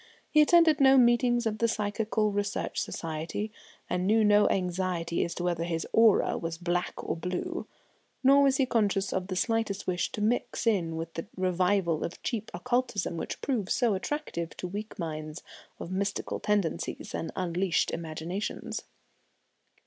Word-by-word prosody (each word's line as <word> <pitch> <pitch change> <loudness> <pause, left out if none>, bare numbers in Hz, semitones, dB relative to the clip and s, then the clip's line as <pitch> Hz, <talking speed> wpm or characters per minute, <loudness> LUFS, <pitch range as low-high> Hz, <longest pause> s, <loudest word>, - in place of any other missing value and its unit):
He 305 - +6
attended 320 -1 +5
no 270 0 +7
meetings 240 -1 +4
of 215 -1 -1
the 230 - +3
Psychical 215 0 0
Research 205 0 -2
Society, 165 +6 -4 0.4
and 180 +1 -1
knew 220 +1 +4
no 210 0 +5
anxiety 180 -2 -1
as 170 - -4
to 175 - -4
whether 175 -2 0
his 165 -1 -2
"aura" 225 -2 +4
was 165 0 -4
black 175 +1 -1
or - - 0
blue; 180 - -4 0.6
nor 275 +2 +7
was 270 -1 +4
he 270 - +3
conscious 205 -5 +1
of 185 -1 -2
the 185 - -3
slightest 225 -1 0
wish 180 -1 -1
to - - -4
mix 235 +3 0
in 180 -8 +1
with 165 0 -5
the 165 - -5
revival 185 -2 +1
of 170 - -5
cheap 220 -3 -3
occultism 240 -2 -1
which 165 - -5
proves 225 -8 0
so 240 -5 +2
attractive 190 - -4
to 180 - -4
weak 205 +4 -6
minds 155 -1 -5 0.4
of 170 - -6
mystical 195 +1 -2
tendencies 205 -6 -1
and 165 - -3
unleashed 180 0 0
imaginations. 165 +4 -4
195 Hz, 155 wpm, -29 LUFS, 175-225 Hz, 0.6 s, no